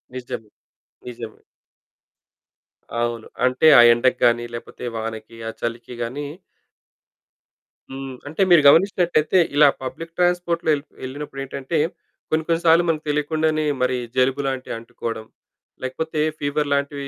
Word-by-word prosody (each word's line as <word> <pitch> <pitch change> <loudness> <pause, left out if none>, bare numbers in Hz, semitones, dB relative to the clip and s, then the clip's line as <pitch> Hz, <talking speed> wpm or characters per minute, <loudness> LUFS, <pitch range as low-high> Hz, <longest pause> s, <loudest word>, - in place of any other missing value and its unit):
నిజమే, 115 -4 -6 0.6
నిజమే. 115 -2 -8 1.6
అవును. 120 -1 -2 0.2
అంటే 130 +4 +1
ఆ - - +11
ఎండకి 125 +2 +1
గాని, 120 0 +3
లేకపోతే 120 +1 -8
వానకి, 110 0 -6
ఆ - - -2
చలికి 115 +1 -4
గాని 135 +5 -4 1.7
హ్మ్, 135 -1 -6
అంటే 160 +6 -3
మీరు 170 -3 +7
గమనించినట్లైతే 175 0 +4 0.2
ఇలా 145 0 +7 0.2
పబ్లిక్ 165 +6 -7
ట్రాన్స్పోర్ట్‌లో 175 -2 +1
ఎల్ 140 - -7 0.2
ఎళ్ళినప్పుడేంటంటే, 135 +2 -5 0.5
కొన్ని, 155 0 +1
కొన్ని 165 0 +1
సార్లు 165 +1 +6
మనకు 155 -1 -1
తెలియకుండానే 155 +1 0 0.2
మరి 125 0 +1 0.2
జలుబు 130 +2 +2
లాంటివి 130 -3 -3
అంటుకోవడం, 115 -1 -6 0.6
లేకపోతే 150 +4 -2 0.2
ఫీవర్ 145 0 -1
లాంటివి 140 0 -2
140 Hz, 115 wpm, -22 LUFS, 125-155 Hz, 1.7 s, ఆ